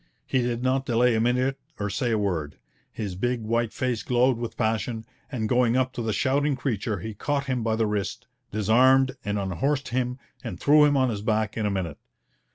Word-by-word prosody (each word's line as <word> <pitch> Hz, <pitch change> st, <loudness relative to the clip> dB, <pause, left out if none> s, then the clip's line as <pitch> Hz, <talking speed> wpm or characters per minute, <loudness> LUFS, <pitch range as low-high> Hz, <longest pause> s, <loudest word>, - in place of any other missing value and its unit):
He 130 Hz, -, +1 dB
did 120 Hz, 0 st, -2 dB
not 130 Hz, +1 st, +1 dB
delay 120 Hz, +1 st, +3 dB
a 110 Hz, -, +2 dB
minute 125 Hz, +3 st, +1 dB, 0.2 s
or 100 Hz, -1 st, -2 dB
say 120 Hz, +5 st, -1 dB
a 110 Hz, -, +2 dB
word. 85 Hz, -8 st, -2 dB, 0.4 s
His 100 Hz, -4 st, -4 dB
big 120 Hz, +5 st, -1 dB
white 115 Hz, +1 st, 0 dB
face 125 Hz, -3 st, -1 dB
glowed 125 Hz, 0 st, +2 dB
with 120 Hz, -1 st, -5 dB
passion, 110 Hz, +1 st, -1 dB, 0.3 s
and 115 Hz, -5 st, -1 dB
going 120 Hz, +1 st, +3 dB
up 130 Hz, 0 st, +1 dB
to 120 Hz, -, -4 dB
the 110 Hz, -1 st, -1 dB
shouting 140 Hz, +7 st, +1 dB
creature 110 Hz, -6 st, -2 dB
he 110 Hz, +3 st, -5 dB
caught 140 Hz, +6 st, -1 dB
him 130 Hz, -3 st, -1 dB
by 110 Hz, -1 st, 0 dB
the 110 Hz, 0 st, +1 dB
wrist, 105 Hz, -2 st, -3 dB, 0.3 s
disarmed 130 Hz, +5 st, +4 dB
and 105 Hz, 0 st, -1 dB
unhorsed 135 Hz, +9 st, -1 dB
him, 125 Hz, 0 st, -1 dB, 0.3 s
and -, -, -6 dB
threw 150 Hz, +1 st, +6 dB
him 145 Hz, -1 st, +3 dB
on 130 Hz, -2 st, +2 dB
his 105 Hz, -2 st, -4 dB
back 110 Hz, -1 st, 0 dB
in 110 Hz, -2 st, 0 dB
a -, -, +1 dB
minute. 90 Hz, -6 st, -3 dB
120 Hz, 205 wpm, -26 LUFS, 110-130 Hz, 0.4 s, threw